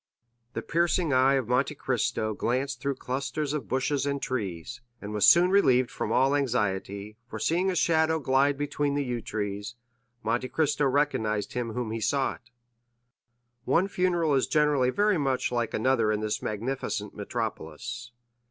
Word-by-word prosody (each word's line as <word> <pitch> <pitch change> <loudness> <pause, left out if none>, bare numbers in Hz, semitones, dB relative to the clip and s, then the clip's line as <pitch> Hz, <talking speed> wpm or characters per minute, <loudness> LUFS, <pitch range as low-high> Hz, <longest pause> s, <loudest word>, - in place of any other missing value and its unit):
The - - -4
piercing 170 -1 +1
eye 130 +2 +4
of 130 -5 -1
Monte 130 +5 +1
Cristo 110 -4 -1
glanced 130 +4 -2
through 140 0 -1
clusters 140 +3 -3
of 150 -6 -3
bushes 140 +2 0
and 140 0 -1
trees, 105 -4 -4 0.2
and 105 +1 -7
was 105 - +4
soon 180 +2 +6
relieved 130 -11 +4
from 110 - -3
all 135 +4 +3
anxiety, 105 -5 -2
for 110 - -7
seeing 175 - +1
a 185 - -1
shadow 160 -1 +2
glide 140 -1 +2
between 145 0 -1
the 145 - 0
yew 120 -3 -3
trees, 105 +1 -4 0.5
Monte 120 +3 -1
Cristo 150 -2 +1
recognized 115 -7 0
him 120 -2 -3
whom 120 -2 -3
he 115 0 -3
sought. 125 +1 -1 1.1
One 165 +10 +2
funeral 175 -5 +1
is 135 - +2
generally 150 -4 +3
very 205 +5 +2
much 135 -3 0
like 120 -2 -1
another 115 -2 +2
in 105 - 0
this 110 -1 -2
magnificent 110 -1 -3
metropolis. 115 +2 -5
130 Hz, 155 wpm, -27 LUFS, 110-145 Hz, 1.1 s, soon